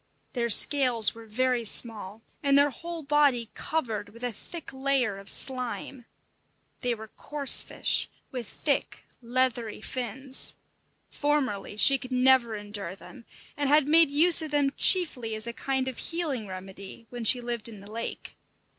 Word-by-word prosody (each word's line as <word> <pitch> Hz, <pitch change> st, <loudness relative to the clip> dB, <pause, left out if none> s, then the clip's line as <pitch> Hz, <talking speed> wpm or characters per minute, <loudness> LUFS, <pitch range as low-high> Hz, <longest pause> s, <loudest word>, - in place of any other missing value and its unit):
Their 235 Hz, -2 st, -2 dB
scales 245 Hz, -2 st, +5 dB
were 225 Hz, 0 st, -14 dB
very 250 Hz, +2 st, -1 dB
small, 220 Hz, -1 st, +1 dB, 0.2 s
and 280 Hz, -1 st, +3 dB
their 285 Hz, 0 st, +4 dB
whole 335 Hz, +2 st, -8 dB
body 275 Hz, -5 st, +1 dB
covered 225 Hz, -10 st, -4 dB
with 230 Hz, +3 st, -14 dB
a 245 Hz, -, -2 dB
thick 315 Hz, -, -8 dB
layer 265 Hz, -6 st, -1 dB
of 195 Hz, -, -12 dB
slime. 250 Hz, -1 st, 0 dB, 0.7 s
They 245 Hz, -2 st, -2 dB
were 220 Hz, 0 st, -12 dB
coarse 290 Hz, +3 st, +3 dB
fish, -, -, -2 dB, 0.2 s
with 250 Hz, -4 st, -6 dB
thick, -, -, -3 dB, 0.2 s
leathery 245 Hz, -2 st, -1 dB
fins. 260 Hz, +3 st, -1 dB, 0.6 s
Formerly 265 Hz, -9 st, -2 dB
she 270 Hz, +5 st, +5 dB
could 255 Hz, 0 st, -10 dB
never 250 Hz, -3 st, +3 dB
endure 205 Hz, -3 st, -6 dB
them, 235 Hz, +4 st, -15 dB, 0.3 s
and 285 Hz, -1 st, -2 dB
had 295 Hz, -1 st, +3 dB
made 320 Hz, 0 st, +5 dB
use 325 Hz, +4 st, +5 dB
of 315 Hz, -, -5 dB
them 290 Hz, -2 st, 0 dB
chiefly 255 Hz, -, +3 dB
as 215 Hz, +1 st, +2 dB
a 235 Hz, -, -5 dB
kind 265 Hz, +1 st, -3 dB
of 260 Hz, -, -6 dB
healing 300 Hz, -10 st, -3 dB
remedy 190 Hz, +3 st, -10 dB
when 240 Hz, -1 st, -7 dB
she 245 Hz, +3 st, +5 dB
lived 235 Hz, -2 st, -5 dB
in 215 Hz, -3 st, -12 dB
the 200 Hz, +2 st, -14 dB
lake. 230 Hz, +1 st, -5 dB
250 Hz, 155 wpm, -26 LUFS, 220-275 Hz, 0.7 s, scales